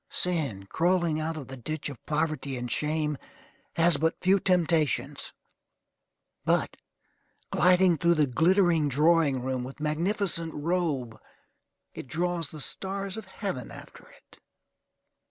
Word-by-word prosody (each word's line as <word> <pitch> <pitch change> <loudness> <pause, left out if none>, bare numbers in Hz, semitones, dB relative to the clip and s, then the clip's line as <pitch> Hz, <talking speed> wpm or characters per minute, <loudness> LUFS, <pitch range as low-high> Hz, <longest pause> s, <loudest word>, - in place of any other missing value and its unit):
Sin, 145 - 0
crawling 170 - +1
out 160 +1 -3
of 140 - -7
the 135 - -8
ditch 155 +4 -5
of 140 -5 -9
poverty 150 -3 -1
and 125 -1 -5
shame, 150 -1 -1 0.6
has 170 -2 +6
but 160 +3 0
few 195 +2 +3
temptations; 165 -6 0 1.1
but, - - +1 0.8
gliding 180 -1 +4
through 170 0 +3
the 155 -2 +3
glittering 165 +2 +3
drawing 150 -2 +3
room 130 -1 -2
with 130 +3 -9
magnificent 165 +2 0
robe, 145 -8 -2 0.7
it - - -8
draws 170 +2 -2
the 155 - -7
stars 195 +4 -3
of 220 -2 -7
heaven 185 - -5
after - - -13
it. - - -21
160 Hz, 125 wpm, -27 LUFS, 140-175 Hz, 1.1 s, has